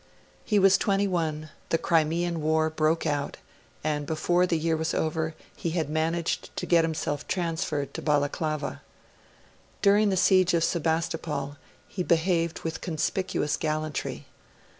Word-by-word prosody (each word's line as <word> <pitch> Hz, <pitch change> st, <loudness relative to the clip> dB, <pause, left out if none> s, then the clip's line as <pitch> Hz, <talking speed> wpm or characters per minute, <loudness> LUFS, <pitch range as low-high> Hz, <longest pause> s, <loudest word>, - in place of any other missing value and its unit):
He 210 Hz, -, +1 dB
was 195 Hz, -1 st, +5 dB
twenty 200 Hz, 0 st, +2 dB
one; 155 Hz, -4 st, -2 dB, 0.2 s
the 165 Hz, -, +3 dB
Crimean 165 Hz, +1 st, +1 dB
War 160 Hz, +1 st, +2 dB
broke 160 Hz, +1 st, +1 dB
out; 145 Hz, -2 st, -1 dB, 0.5 s
and 150 Hz, -1 st, -1 dB
before 175 Hz, +3 st, +2 dB
the 170 Hz, -, +1 dB
year 160 Hz, +1 st, +1 dB
was 160 Hz, +1 st, -1 dB
over, 160 Hz, 0 st, -1 dB, 0.2 s
he 170 Hz, -, -3 dB
had 155 Hz, -3 st, -1 dB
managed 165 Hz, +2 st, -1 dB
to -, -, -2 dB
get 170 Hz, -2 st, +4 dB
himself 155 Hz, -2 st, -2 dB
transferred 160 Hz, -5 st, -2 dB
to -, -, -5 dB
Balaclava. 150 Hz, +1 st, -1 dB, 1.0 s
During 205 Hz, +1 st, +5 dB
the 190 Hz, -, +1 dB
siege 185 Hz, -1 st, +4 dB
of 165 Hz, -, +2 dB
Sebastopol 160 Hz, -4 st, -1 dB, 0.3 s
he 190 Hz, -, -4 dB
behaved 170 Hz, -1 st, +1 dB
with 160 Hz, -1 st, -4 dB
conspicuous 175 Hz, -1 st, -1 dB
gallantry. 155 Hz, -1 st, -3 dB
160 Hz, 140 wpm, -27 LUFS, 155-175 Hz, 1.0 s, was